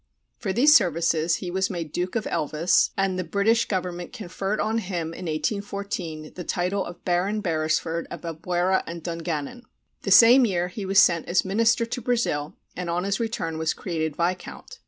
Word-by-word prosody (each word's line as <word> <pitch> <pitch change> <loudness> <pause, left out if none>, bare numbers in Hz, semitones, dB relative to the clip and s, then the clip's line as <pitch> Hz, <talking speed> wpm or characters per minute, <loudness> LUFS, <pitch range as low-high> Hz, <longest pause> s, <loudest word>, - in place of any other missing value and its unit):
For 205 -5 -2
these 285 +9 +6
services 170 -3 +3
he 180 - -5
was 190 +1 0
made 170 -5 -5
Duke 180 +4 -3
of 225 - -1
Elvas, 155 +4 +2
and 195 -1 0
the - - -1
British 200 +7 +2
government 180 -2 -3
conferred 195 +1 -4
on 220 +2 0
him 175 -5 -4
in 180 - -8
1814 170 -1 -3
the 180 - -7
title 180 +3 -1
of 175 -1 -10
Baron 185 +4 +1
Beresford 160 -2 -1
of - - -7
Albuera 175 +3 0
and 170 -1 -7
Dungannon. 165 - -4 0.4
The - - -4
same 245 +3 +8
year 180 -5 0
he 195 +1 -6
was 195 +1 0
sent 170 -4 +5
as 175 +2 +2
minister 230 +4 +2
to 245 +2 -5
Brazil, 215 -12 -1 0.2
and 180 0 -4
on 175 +1 -1
his 195 0 -1
return 165 -9 -3
was 160 0 0
created 160 -4 -3
viscount. 180 - -4
180 Hz, 175 wpm, -25 LUFS, 165-200 Hz, 0.4 s, same